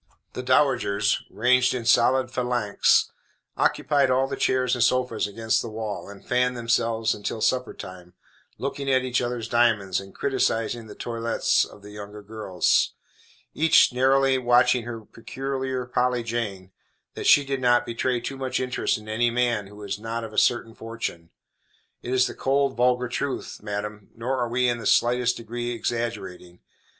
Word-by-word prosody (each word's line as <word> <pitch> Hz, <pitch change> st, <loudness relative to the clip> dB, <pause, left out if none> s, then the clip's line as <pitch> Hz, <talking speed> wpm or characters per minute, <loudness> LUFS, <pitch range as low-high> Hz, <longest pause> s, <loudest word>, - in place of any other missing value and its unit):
The -, -, -4 dB
dowagers, 125 Hz, -6 st, +2 dB
ranged 125 Hz, +3 st, +3 dB
in 120 Hz, -2 st, -4 dB
solid 125 Hz, +2 st, +3 dB
phalanx, 125 Hz, -5 st, +2 dB, 0.4 s
occupied 140 Hz, -3 st, +2 dB
all 130 Hz, +1 st, +3 dB
the -, -, -4 dB
chairs 130 Hz, -1 st, +1 dB
and 125 Hz, -3 st, +2 dB
sofas 125 Hz, -4 st, +1 dB
against 110 Hz, +2 st, 0 dB
the 115 Hz, -, -6 dB
wall, 110 Hz, -2 st, -5 dB
and 100 Hz, -1 st, -12 dB
fanned 125 Hz, 0 st, +1 dB
themselves 115 Hz, -1 st, +1 dB
until 105 Hz, +2 st, -4 dB
supper 125 Hz, +2 st, 0 dB
time, 90 Hz, -1 st, -10 dB, 0.4 s
looking 140 Hz, 0 st, -3 dB
at 130 Hz, -1 st, +3 dB
each 125 Hz, -1 st, 0 dB
other's 120 Hz, -2 st, -3 dB
diamonds, 115 Hz, -5 st, +2 dB
and 95 Hz, 0 st, -12 dB
criticizing 120 Hz, -4 st, -1 dB
the 105 Hz, -, -11 dB
toilettes 115 Hz, -1 st, 0 dB
of 100 Hz, -, -15 dB
the 105 Hz, -, -11 dB
younger 105 Hz, 0 st, -9 dB
ladies, 105 Hz, -5 st, +1 dB, 0.6 s
each 160 Hz, -5 st, +5 dB
narrowly 135 Hz, +1 st, +3 dB
watching 125 Hz, -1 st, +3 dB
her 115 Hz, -2 st, -6 dB
peculiar 130 Hz, +3 st, -4 dB
Polly 125 Hz, -1 st, 0 dB
Jane, 105 Hz, -5 st, -4 dB, 0.4 s
that -, -, -4 dB
she 145 Hz, -, +6 dB
did 135 Hz, -1 st, -3 dB
not 120 Hz, -1 st, +3 dB
betray 120 Hz, +1 st, -1 dB
too 135 Hz, +3 st, -6 dB
much 130 Hz, -1 st, -2 dB
interest 125 Hz, -1 st, -1 dB
in 110 Hz, 0 st, -13 dB
any 115 Hz, +2 st, +1 dB
man 120 Hz, -4 st, 0 dB
who 105 Hz, -, -14 dB
was 105 Hz, -1 st, -5 dB
not 115 Hz, +1 st, -4 dB
of 110 Hz, -1 st, -8 dB
a -, -, -9 dB
certain 115 Hz, -2 st, +1 dB
fortune. 110 Hz, -8 st, -6 dB, 0.7 s
It 120 Hz, -, -6 dB
is 130 Hz, 0 st, +3 dB
the -, -, -4 dB
cold, 135 Hz, 0 st, 0 dB
vulgar 125 Hz, +1 st, +2 dB
truth, 135 Hz, +3 st, -4 dB
madam, 105 Hz, 0 st, -5 dB
nor 125 Hz, +4 st, -2 dB
are 120 Hz, -1 st, -1 dB
we 125 Hz, +1 st, +1 dB
in 120 Hz, -1 st, 0 dB
the -, -, -3 dB
slightest 125 Hz, +1 st, +2 dB
degree 120 Hz, +1 st, -5 dB
exaggerating. 105 Hz, -7 st, -4 dB
120 Hz, 165 wpm, -25 LUFS, 110-125 Hz, 0.7 s, she